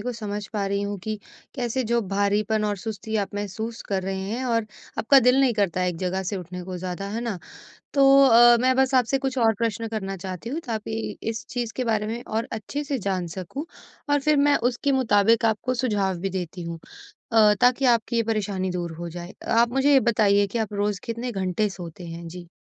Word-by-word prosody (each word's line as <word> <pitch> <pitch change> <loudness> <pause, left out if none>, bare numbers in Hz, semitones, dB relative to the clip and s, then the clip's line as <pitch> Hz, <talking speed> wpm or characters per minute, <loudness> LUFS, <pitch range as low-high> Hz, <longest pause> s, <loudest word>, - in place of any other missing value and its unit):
को 250 +4 -3
समझ 210 -3 -5
पा 205 -2 -1
रही 200 0 -1
हूँ 200 0 -3
कि 215 +3 -4 0.4
कैसे 250 0 -1
जो 235 +1 +1
भारीपन 205 +2 +1
और 205 -1 0
सुस्ती 220 +1 -4
आप 195 - -16
महसूस 220 +3 -4
कर 195 -2 0
रहे 190 0 -3
हैं 245 +4 -2
और 230 -3 0 0.3
आपका 275 +5 +6
दिल 250 +2 +4
नहीं 265 -3 +4
करता 195 -4 0
है 180 - +1
एक 175 - -3
जगह 185 +1 -1
से 195 +2 -3
उठने 180 0 -7
को 185 0 -5
ज़्यादा, 185 +2 -5
है 225 +3 -3
ना? 230 -6 -3 0.6
तो 275 -1 +4 0.2
अ, 240 -1 +7
मैं 255 0 +3
बस 265 0 +2
आपसे 255 +2 +3
कुछ 265 -1 -3
और 225 -2 +4
प्रश्न 230 0 -1
करना 195 -3 -4
चाहती 185 +4 -6
हूँ 295 +6 -2
ताकि 220 0 -4
इस 225 0 -3
चीज़ 240 -2 -3
के 255 - -1
बारे 220 -3 0
में 230 +2 -4
और 225 +2 -3
अच्छे 225 +7 -4
से 280 -1 -2
जान 190 -3 -2
सकूँ 185 - -6 0.4
और 290 0 +3
फिर 300 +1 +3
मैं 285 0 +4
उसके 255 +3 -1
मुताबिक 230 -3 +3
आपको 225 +3 0
सुझाव 205 -7 0
भी 195 +2 -2
देती 180 -1 -5
हूँ 165 0 -6 0.5
अ, 215 -2 +6
ताकि 250 +2 +4
आपकी 235 -1 +2
ये 230 - +3
परेशानी 205 -4 -1
दूर 175 -2 -3
हो 170 0 -5
जाए, 175 +2 -8
आप 230 +1 +3
मुझे 270 +3 +3
ये 270 - +7
बताइए 205 -2 +3
कि 200 - -4
आप 220 -2 -2
रोज़ 205 -1 -1
कितने 235 +2 -3
घंटे 195 +1 -1
सोते 175 -2 -9
हैं? 170 0 -7
जी। 175 +1 -9
215 Hz, 220 wpm, -24 LUFS, 190-235 Hz, 0.6 s, अ